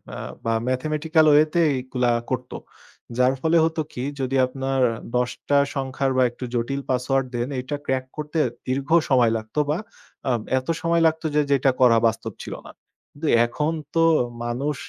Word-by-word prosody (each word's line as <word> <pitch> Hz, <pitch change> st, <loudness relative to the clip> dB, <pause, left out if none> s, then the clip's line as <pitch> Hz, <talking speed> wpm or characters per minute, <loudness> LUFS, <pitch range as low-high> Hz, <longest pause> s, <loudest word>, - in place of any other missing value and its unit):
আ -, -, -6 dB, 0.3 s
বা 115 Hz, -, +1 dB
ম্যাথমেটিক্যাল 155 Hz, +5 st, +1 dB
ওয়েতে 155 Hz, +3 st, +4 dB, 0.2 s
এগুলা 125 Hz, -1 st, 0 dB, 0.2 s
করত। 125 Hz, -1 st, -3 dB, 0.7 s
যার 125 Hz, +1 st, +4 dB
ফলে 160 Hz, +3 st, +3 dB
হতো 160 Hz, 0 st, -1 dB
কি 125 Hz, -, -4 dB, 0.2 s
যদি 135 Hz, 0 st, -1 dB
আপনার 135 Hz, +1 st, -2 dB, 0.3 s
১০ 125 Hz, 0 st, +2 dB, 0.2 s
টা 145 Hz, -, +5 dB, 0.2 s
সংখ্যারও 135 Hz, -1 st, -1 dB
একটু 120 Hz, -, -11 dB
জটিল 135 Hz, +4 st, -1 dB
পাসওয়ার্ড 130 Hz, +1 st, +1 dB
দেন 120 Hz, +1 st, -1 dB
এটা 135 Hz, +3 st, -4 dB
ক্রাক 130 Hz, -1 st, -1 dB
করতে 150 Hz, +2 st, -3 dB, 0.3 s
দীর্ঘ 135 Hz, +2 st, -2 dB, 0.2 s
সময় 125 Hz, -4 st, +4 dB
লাগতো 110 Hz, +6 st, -5 dB
বা 150 Hz, -, +1 dB, 0.5 s
আ -, -, +3 dB, 0.3 s
এত 130 Hz, -, -13 dB
সময় 170 Hz, 0 st, +2 dB
লাগতো 160 Hz, +1 st, -2 dB
যে -, -, +4 dB, 0.2 s
এটা 135 Hz, -, +3 dB
করা 120 Hz, -2 st, +6 dB
বাস্তব 110 Hz, -1 st, -3 dB
ছিল -, -, -6 dB
না। -, -, -10 dB, 0.4 s
কিন্তু 150 Hz, +2 st, -5 dB, 0.2 s
এখন 150 Hz, +7 st, -1 dB, 0.2 s
তো 165 Hz, -, +4 dB, 0.4 s
মানুষ 135 Hz, +5 st, -2 dB
135 Hz, 160 wpm, -23 LUFS, 125-150 Hz, 0.7 s, করা